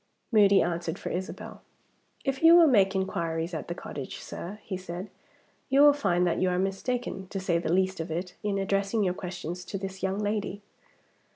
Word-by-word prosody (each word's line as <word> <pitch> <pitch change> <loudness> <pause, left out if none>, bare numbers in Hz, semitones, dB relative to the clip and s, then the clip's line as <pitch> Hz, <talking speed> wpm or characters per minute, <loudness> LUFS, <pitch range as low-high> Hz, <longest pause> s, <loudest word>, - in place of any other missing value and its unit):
Moody 200 -3 +6
answered 170 0 -2
for - - -5
Isabel. 185 +1 -6 0.6
"If 270 -1 -1
you 330 +1 +8
will 345 -1 +8
make 200 -9 +4
inquiries 170 -3 -2
at 160 - -4
the 175 - -4
cottage, 140 -6 -7
sir," 195 +5 -7
he 195 - -4
said, 185 +1 -7 0.6
"you 275 +1 +5
will 290 0 +8
find 180 -10 +1
that 170 -2 0
you 185 - +3
are 180 - 0
mistaken, 195 +1 -2
to 195 - -4
say 175 -3 +1
the 165 - -2
least 190 +1 +1
of 165 +1 -4
it, 180 +3 -4
in 205 -2 -1
addressing 195 +2 0
your 180 -2 +1
questions 180 -1 -6
to 195 - -4
this 190 0 -6
young 190 +1 -1
lady." 205 -1 -2
190 Hz, 190 wpm, -28 LUFS, 175-205 Hz, 0.6 s, you